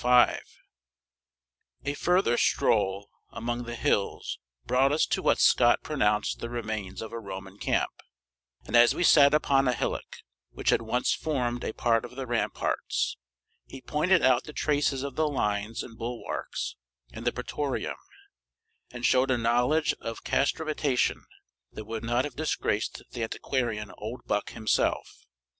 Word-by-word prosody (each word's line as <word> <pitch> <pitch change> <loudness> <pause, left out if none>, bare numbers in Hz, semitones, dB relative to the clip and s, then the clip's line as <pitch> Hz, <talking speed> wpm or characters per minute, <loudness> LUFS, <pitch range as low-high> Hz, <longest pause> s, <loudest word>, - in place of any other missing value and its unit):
A 145 - 0
further 180 -6 +2
stroll 100 -3 +1 0.2
among 120 +1 -4
the 120 0 -5
hills 100 -3 -1 0.3
brought 130 +2 +3
us 150 - +3
to - - -1
what - - +3
Scott 120 -1 +5
pronounced 105 -9 0
the 120 - -5
remains 110 -4 -4
of 110 - -8
a 115 - -4
Roman 95 -1 -8
camp, - - 0 0.7
and - - -2
as 120 0 +6
we - - 0
sat 145 -3 +7
upon 135 -3 +3
a 125 - +3
hillock - - -4 0.3
which - - +1
had - - +3
once 115 +2 0
formed 125 -6 -2
a - - -2
part 115 0 +1
of 120 +1 -9
the 135 0 -4
ramparts, 120 -1 -1 0.5
he 135 - -9
pointed 155 +7 +2
out 130 -1 +4
the 150 - -9
traces 145 -3 0
of 140 -2 -5
the 155 0 +2
lines 105 -5 -1
and 115 -2 -12
bulwarks, 120 +1 -4 0.4
and - - -7
the - - +4
pratorium, 145 -3 -3 0.9
and 120 0 -5
showed 130 +1 +4
a 130 - +3
knowledge 125 +7 +2
of 115 0 -6
castramatation 145 -2 0 0.5
that 110 - -7
would 110 +1 -5
not 120 +3 +1
have 145 - -7
disgraced 150 -8 -1
the 120 - -6
antiquarian 115 -2 -2
Oldbuck 105 -2 -3
himself. 110 - -1
120 Hz, 145 wpm, -28 LUFS, 115-140 Hz, 0.9 s, sat